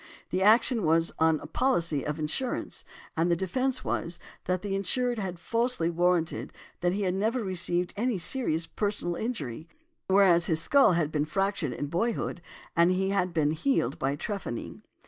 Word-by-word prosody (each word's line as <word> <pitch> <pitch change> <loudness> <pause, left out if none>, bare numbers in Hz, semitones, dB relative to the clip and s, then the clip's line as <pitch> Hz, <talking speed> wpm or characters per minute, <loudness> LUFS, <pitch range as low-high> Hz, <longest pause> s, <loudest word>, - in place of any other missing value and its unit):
The 185 - 0
action 225 +3 +5
was 165 +1 +2
on 160 -1 +3
a - - -8
policy 170 - 0
of 150 +1 -3
insurance, 160 +12 -3 0.3
and 165 +2 +1
the 170 - +3
defence 255 +9 -1
was, 170 +1 -2 0.3
that 185 +1 -1
the 200 -1 -2
insured 240 +5 0
had 185 -3 -4
falsely 230 -5 0
warranted 175 -1 0 0.3
that 175 0 +1
he 200 +1 -1
had 180 -2 0
never 220 +5 0
received 175 -2 -1
any 235 0 0
serious 170 -4 0
personal 200 -4 -2
injury, 160 - -4 0.4
whereas 190 -3 +5
his 160 -2 +2
skull 270 - +5
had 165 -3 0
been 150 -1 0
fractured 195 -4 -1
in 145 - -3
boyhood, 175 +3 -2 0.3
and 170 +1 +5 0.2
had 185 -2 +1
been 155 -3 +1
healed 220 - 0
by 135 +1 0
trephining. 190 - -5
180 Hz, 165 wpm, -28 LUFS, 165-210 Hz, 0.4 s, action